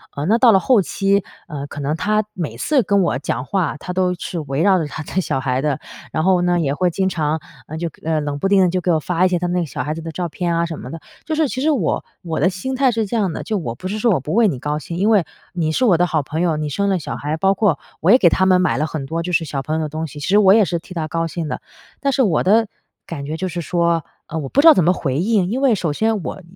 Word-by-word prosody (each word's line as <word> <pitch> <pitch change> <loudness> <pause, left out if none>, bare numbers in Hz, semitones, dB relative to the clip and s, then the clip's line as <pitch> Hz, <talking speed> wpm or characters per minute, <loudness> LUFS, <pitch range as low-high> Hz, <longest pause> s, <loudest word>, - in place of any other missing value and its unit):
呃， 145 - -3
那 220 +7 +3
到 240 -1 +6
了 195 - +5
后 235 0 +3
期， 195 +2 +1 0.2
呃， 145 -3 -5
可 145 - -8
能 145 +2 -1
她 215 +5 +1
每 170 -5 -4
次 290 -4 +2
跟 200 -1 +2
我 170 -8 +1
讲 130 -2 -3
话， 185 -4 -1
她 180 - -7
都 180 0 +1
是 175 0 -5
围 140 0 -2
绕 190 0 +4
着 160 - -1
她 155 - -7
的 185 - -2
小 135 - -2
孩 130 0 -1
的。 145 -3 -1 0.3
然 155 - -1
后 185 0 +3
呢， 175 0 +2
也 140 -4 0
会 180 +4 +1
经 190 +3 -1
常， 160 -2 -1 0.3
呃， 155 - -6
就 170 0 -2
呃， 160 -1 0
冷 145 -1 -3
不 195 - 0
丁 195 -1 +4
地 180 - +4
就 185 +1 0
给 180 - +1
我 160 - +2
发 180 +3 +1
一 - - +3
些 180 - +1
他 180 - -1
们 175 - -2
那 - - +2
个 - - -1
小 - - -4
孩 150 - -2
子 165 - -6
的 165 0 -6
照 175 +3 -3
片 170 +1 -2
啊 170 0 +1
什 165 -2 -6
么 - - -8
的。 165 - -7 0.3
就 315 - -3
是 310 -1 +2
其 260 - -4
实 310 +2 +3
我 220 - 0 0.2
我 165 -2 -3
的 185 - +3
心 230 +8 -4
态 260 -1 +3
是 225 -2 -1
这 230 - -3
样 195 -6 +1
的， - - -5
就 215 - -2
我 135 -11 -4
不 185 - -6
是 205 - -3
说 235 0 +3
我 180 - +2
不 150 +6 -5
为 230 0 +4
你 130 - -4
高 150 +2 -2
兴， 170 +3 -6
因 200 +4 +2
为 210 -5 +4 0.3
你 160 -3 -1
是 255 - +1
我 185 -8 +4
的 175 - +3
好 160 -4 0
朋 155 +4 -4
友， 165 -3 +1
你 150 0 -2
生 200 +8 0
了 190 -2 +1
小 - - -5
孩， 150 +2 -3
包 195 +3 +3
括 195 -7 +1 0.2
我 180 +6 +4
也 245 - +8
给 185 - +4
他 190 - +2
们 185 -1 +4
买 180 - +1
了 150 - +1
很 150 -3 -5
多 165 +4 -3
就 180 - -4
是 165 -1 +1
小 140 -2 -3
朋 155 +3 -3
友 - - -1
的 155 - -2
东 155 +2 -4
西， 150 0 -10
其 145 - -4
实 205 - +4
我 195 -2 +6
也 215 -2 +5
是 175 - -1
替 180 - -12
她 160 -3 -3
高 165 +1 -1
兴 165 -1 -4
的。 - - -4 0.4
但 280 0 +1
是 270 - +2
我 190 -10 +2
的 220 +4 +4 0.4
感 145 -4 -6
觉 155 +2 -4
就 185 - -2
是 175 -1 -4
说， 170 -1 +1 0.2
呃， 160 - -5
我 145 - -4
不 280 - +3
知 330 - +6
道 320 - +11
怎 185 - +2
么 180 +3 +4
回 135 -6 -2
应， 195 -1 +1
因 250 +4 -1
为 260 -5 +4
首 170 -5 -1
先 220 +1 0
我 195 - -6
175 Hz, 340 characters per minute, -20 LUFS, 155-195 Hz, 0.4 s, 道